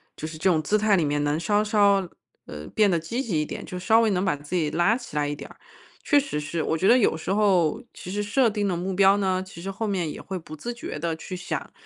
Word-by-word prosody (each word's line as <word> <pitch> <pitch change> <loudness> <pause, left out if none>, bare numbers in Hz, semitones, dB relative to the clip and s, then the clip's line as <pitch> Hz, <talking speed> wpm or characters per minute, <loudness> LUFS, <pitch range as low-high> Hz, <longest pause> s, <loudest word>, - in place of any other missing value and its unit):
就 155 - -5
是 160 0 -8
这 175 - 0
种 160 -3 +2
姿 210 - +1
态 215 -1 +3
里 175 - +2
面 145 0 0
能 145 +1 0
稍 205 +5 +1
稍 200 -3 +3 0.4
呃 75 0 -8
变 210 -2 +4
得 170 - +2
积 235 +12 -3
极 170 -9 0
一 150 - -1
点， - - -7
就 180 - -6
稍 220 +5 +4
微 220 -2 +2
能 185 0 0
把 170 -7 +1
自 145 +5 -6
己 160 -4 +1
拉 175 +8 +2
起 250 - -9
来 145 -1 +1
一 145 - -3
点 - - -10
儿， - - -15 0.5
确 290 - +4
实 275 - -3
是， 155 +2 -3
我 160 - 0
觉 190 - +1
得 245 - +7
有 215 -9 +3
时 185 +4 -2
候 190 -7 +2
其 180 - -9
实 205 +1 -1
设 230 +5 +2
定 205 -1 -1
的 180 -3 -1
目 185 +2 -3
标 195 +1 +5
呢， 190 -2 0
其 185 -3 -12
实 195 - -3
后 215 +3 -3
面 180 -6 -1
也 - - -9
会 190 -1 -5
不 155 -2 -9
自 235 +11 -5
觉 235 -9 -6
地 165 0 -2
去 180 +3 -7
想， 180 - -5
185 Hz, 305 characters per minute, -25 LUFS, 160-205 Hz, 0.5 s, 得